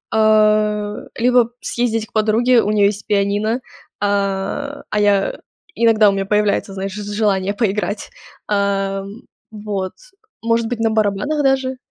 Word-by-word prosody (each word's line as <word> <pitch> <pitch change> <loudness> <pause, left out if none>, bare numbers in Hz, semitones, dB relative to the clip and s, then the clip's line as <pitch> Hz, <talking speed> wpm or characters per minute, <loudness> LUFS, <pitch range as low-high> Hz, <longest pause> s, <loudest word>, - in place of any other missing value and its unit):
э, 215 -1 +3 0.2
либо 245 0 +3
съездить 225 -2 -1
к - - -33
подруге. 225 +3 +3
У 210 - 0
нее 210 -1 +3
есть 205 0 -4
пианино. 205 +3 0 0.4
А, 200 +8 -2
а 210 - 0
я 200 -1 +2 0.4
иногда 225 -2 +4
у - - +2
меня 195 0 -2
появляется, 210 -1 0
знаешь, 195 0 -4
ж 210 - -6
желание 205 -2 0
поиграть. 205 -1 -2 0.4
А, 195 -1 0
м, 200 +6 -10 0.3
вот. 205 -3 -4 0.5
Может 230 0 +1
быть, 240 0 -4
на 225 0 +2
барабанах 220 +7 0
даже. 265 -1 +1
210 Hz, 140 wpm, -19 LUFS, 200-225 Hz, 0.5 s, иногда